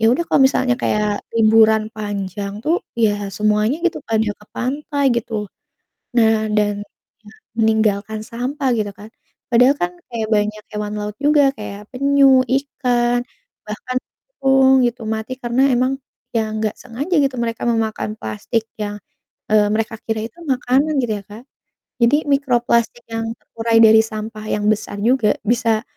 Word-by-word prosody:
Ya, 225 - +1
udah 340 +7 0
kalau - - +3
misalnya 260 -2 +1
kayak 210 0 +1 0.3
liburan 220 -1 +5
panjang 200 -1 -4
tuh 330 +3 +2 0.3
ya 215 - +4 0.3
semuanya 215 +5 +2
gitu 350 - -1
pada 220 -1 +2 0.2
ke - - -16
pantai 285 +2 -2
gitu. 235 0 -4 0.8
Nah 220 -2 +3
dan 205 -1 +2
iya, - - -40 0.6
meninggalkan 220 -1 +1
sampah 260 +4 -2
gitu 210 -2 -2
kan. 210 +2 -11 0.4
Padahal 250 +4 +5
kan 175 - 0 0.2
kayak 225 -2 -3
banyak 210 0 -1
hewan 210 0 -4
laut 210 0 -5
juga 295 -1 +5
kayak 205 -1 -7
penyu, 275 0 +4
ikan, 245 -2 +1 0.5
bahkan 250 +4 -4 0.4
burung 270 0 +5
gitu 240 0 -5
mati 220 +3 -4
karena 240 +2 +1
emang, 255 +2 0 0.4
ya 225 - +3
nggak 215 0 -1
sengaja 250 +8 -6
gitu 270 -1 0
mereka 230 -1 -4
memakan 220 -2 -1
plastik 110 - -2 0.2
yang, 205 0 -3 0.6
eee, 210 -1 +5
mereka 225 +1 -1
kira 220 -1 -1
itu 230 - -29 0.2
makanan 260 +5 +1
gitu 225 -3 -1
ya, 200 - -14
Kak. 215 +4 -11 0.6
Jadi 235 +5 +5 0.2
mikroplastik 240 -3 +1
yang 225 0 -2
terurai 225 0 0
dari 220 0 +7
sampah 215 0 -6
yang 210 0 -1
besar 210 -1 -5
juga 230 -2 +3
bisa 230 -1 +1
225 Hz, 150 wpm, -19 LUFS, 215-255 Hz, 0.8 s, dari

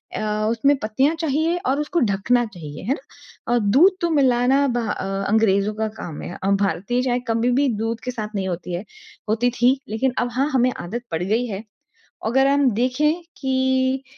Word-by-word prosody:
अ, - - -3 0.3
उसमें 275 +5 +3
पत्तियाँ 265 +9 +1
चाहिए 320 +2 +1
और 270 +3 +1
उसको 300 +3 0
ढकना 240 +5 +2
चाहिए। 165 -9 -9
है 245 +8 +1
ना 245 - -6
अ, - - +4
दूध 295 - +4
तो 340 - +1
मिलाना 265 +2 +3
बाहर 195 -4 -2
अंग्रेज़ों 210 -1 +2
का 220 0 -1
काम 155 -4 -6
है। - - -6
अ, - - 0
भारतीय 200 +6 0
चाय 245 -1 +1
कभी 230 +2 +1
भी 285 - +3
दूध 225 +1 -2
के 250 - -3
साथ 215 -2 -6
नहीं 190 -1 -1
होती 175 0 -4
है 180 +5 -4 0.4
होती 235 +3 +2
थी। 260 +2 +4
लेकिन 240 +4 0
अब 245 - 0
हाँ 280 +2 +2
हमें 255 0 +3
आदत 230 +8 -5
पड़ 165 +2 -1
गयी 225 +6 0
है। 200 0 -5 0.6
अगर 265 +4 +3
हम 280 -1 +3
देखें 300 +7 +1 0.2
कि 260 0 +1
245 Hz, 185 wpm, -22 LUFS, 210-265 Hz, 0.6 s, अ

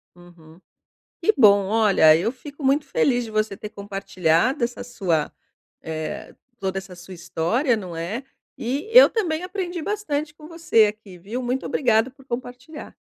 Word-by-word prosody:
Uhum. 175 -2 -17 0.6
Que 435 - +4
bom. 205 -5 +6
Olha, 200 -8 +5
eu 180 +8 -1
fico 285 +3 -12
muito 280 +2 +2
feliz 250 -3 +1
de 225 - -8
você 215 -2 -1
ter 210 - -7
compartilhado 200 - 0
essa 240 +1 -5
sua 180 -10 -1 0.5
eh, 160 -1 -6 0.2
toda 190 -1 -3
essa 190 -1 -7
sua 180 +2 -11
história, 180 - 0
não 180 -5 -7
é? 180 +10 -4 0.3
E, 270 - -3
eu - - +9
também 350 -7 -2
aprendi 365 -2 -4
bastante 310 -7 -3
com 305 0 -13
você 330 -10 +3
aqui, 210 -3 -6
viu. 210 +8 -5
Muito 250 +1 -2
obrigado 235 -1 +1
por 270 0 -20
compartilhar. 250 +4 -8
225 Hz, 155 wpm, -23 LUFS, 185-280 Hz, 0.6 s, eu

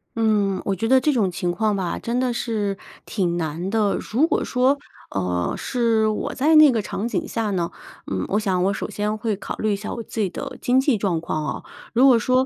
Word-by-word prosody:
嗯， 210 -4 +1
我 195 - 0
觉 225 +5 -2
得 260 0 +6
这 300 +2 +2
种 210 -7 +1
情 175 -1 -2
况 215 +2 +1
吧 185 -3 -2
真 240 +2 -2
的 250 -2 0
是 210 -4 -2 0.3
挺 175 -4 -1
难 165 +3 -3
的。 210 -2 +1 0.2
如 275 +8 +3
果 - - 0
说， 260 +3 +2 0.3
呃， 90 -2 -1
是 230 -4 +1
我 215 - -2
在 305 +4 +3
那 305 -2 +9
个 225 - 0
场 205 +1 -4
景 - - -2
下 225 -3 -2
呢？ 175 -3 -1 0.4
嗯， 95 -1 -1
我 205 - +1
想 190 -4 0
我 195 - +2
首 - - -4
先 210 +1 -2
会 215 -1 -1
考 - - -5
虑 215 -1 0
一 - - +2
下 205 +2 -5
我 235 - -5
自 225 - -7
己 195 - +1
的 - - -6
经 250 +1 +3
济 265 -5 +2
状 185 -5 0
况 155 -2 -2
哦。 - - -4 0.3
如 245 +3 +5
果 250 - +7
说 255 +4 +2
215 Hz, 245 characters per minute, -22 LUFS, 190-240 Hz, 0.4 s, 那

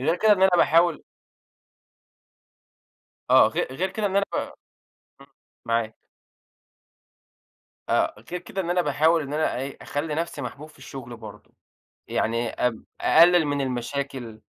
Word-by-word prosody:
غير 160 +6 +1
كده 215 +3 +4
إن 190 -2 +2
أنا 190 - +6
باحاول 165 0 +3 2.3
آه - - +7
غي - - -1
غير 185 +8 -2
كده 210 +2 -3
إن 195 -1 -1
أنا 200 - +3
ف - - 0 0.9
إمم، - - -15 0.4
معاك. 115 -1 -1 1.9
آآ، - - 0
غير 180 - -3
كده 185 +2 -5
إن 175 - -5
أنا 180 0 +2
باحاول 160 +2 +2
إن 145 0 -6
أنا 155 +1 0
أ - - -3
إيه، 135 +1 -6
أخلّي 150 +1 -3
نَفسي 165 -3 -3
محبوب 145 +4 -7
في - - -21
الشغل 120 -3 -9
برضو، 110 -3 -12 0.6
يعني 115 +1 -1
أب 125 -3 -2 0.2
أقلل 170 0 +6
من 145 -1 -1
المشاكل، 125 -2 -4
150 Hz, 145 wpm, -24 LUFS, 125-175 Hz, 2.3 s, آه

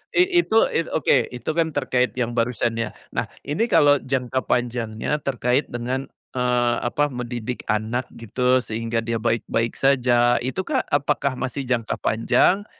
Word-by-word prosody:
i 360 0 +4
itu 225 -9 0 0.2
it 165 - 0
oke, 150 - +3
itu, 125 0 -6
kan, 165 0 +1
terkait 130 -3 +1
yang 120 -2 0
barusan, 115 0 0
ya. 115 -2 -1 0.2
Nah - - 0 0.2
ini 150 +11 0
kalau 145 -1 +5
jangka 130 -1 -1
panjangnya 120 +3 -1
terkait 125 0 0
dengan, 125 +3 -3 0.2
eee, 125 -1 +1
apa 145 +4 +1
mendidik 120 -1 -4
anak 110 +4 0
gitu 125 +3 +1
sehingga 115 +1 -3
dia 115 0 -1
baik-baik 115 0 0
saja 120 -3 +3
itu, 130 +9 -2
kah, 275 -4 +1
apakah 140 -2 0
masih 135 +2 -3
jangka 115 -3 0
panjang 180 - +2
125 Hz, 150 wpm, -23 LUFS, 120-140 Hz, 0.2 s, kalau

